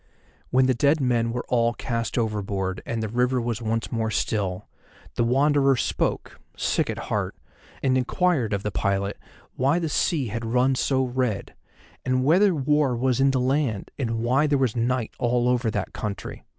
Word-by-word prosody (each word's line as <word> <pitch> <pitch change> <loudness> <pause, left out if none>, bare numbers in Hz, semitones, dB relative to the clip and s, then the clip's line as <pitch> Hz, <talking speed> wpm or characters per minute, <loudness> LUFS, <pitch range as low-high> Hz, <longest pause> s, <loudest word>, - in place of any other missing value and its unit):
When 130 +1 +4
the 130 - +3
dead 145 +6 +2
men 120 -3 +1
were 125 +1 -4
all 120 -1 +2
cast 115 -2 -3
overboard 100 -4 -2
and 115 -1 -2
the - - -1
river 125 +3 +1
was 120 -1 -2
once 115 0 -2
more 110 -2 -1
still, 100 -3 -2 0.5
the - - 0
Wanderer 135 +2 +3
spoke, 120 - -2 0.2
sick - - 0
at - - -3
heart, - - -3 0.5
and 130 -1 +3
inquired 130 - +1
of 100 -1 -1
the 105 - -2
pilot 100 +1 -1 0.4
why 135 +5 +2
the 165 -3 -1
sea 145 -4 0
had 115 +3 -4
run 125 +4 +2
so 130 0 +1
red, 125 -5 -2 0.5
and 130 0 +1
whether 185 +5 +4
war 145 -2 +2
was 125 0 +1
in 135 - +5
the 135 -1 +1
land, 130 -5 0
and 115 -4 -2
why 135 +5 +3
there 145 -1 +2
was 130 -5 0
night 120 0 0
over 120 - +1
all 125 +1 +3
that 110 -5 -2
country. 105 -3 -6
125 Hz, 175 wpm, -24 LUFS, 115-135 Hz, 0.5 s, in